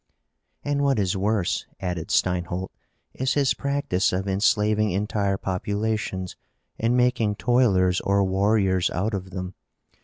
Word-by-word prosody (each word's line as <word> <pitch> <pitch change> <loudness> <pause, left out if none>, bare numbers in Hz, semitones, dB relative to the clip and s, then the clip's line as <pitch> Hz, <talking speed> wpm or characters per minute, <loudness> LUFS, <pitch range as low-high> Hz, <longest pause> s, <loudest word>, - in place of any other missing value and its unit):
"And 145 0 0
what 140 -3 +2
is 95 -3 0
worse," 100 -2 0
added 90 -3 -3
Steinholt, 90 +1 0 0.4
"is 130 +1 -1
his 140 -3 +3
practice 140 -10 0
of 95 +2 -2
enslaving 105 +2 +2
entire 100 0 -1
populations 100 0 -2 0.4
and 115 +2 +2
making 120 -4 +2
toilers 100 -7 +2
or 100 0 +2
warriors 95 -1 +2
out 105 +5 -2
of 95 -1 -4
them. 90 0 -6
100 Hz, 125 wpm, -24 LUFS, 95-110 Hz, 0.4 s, his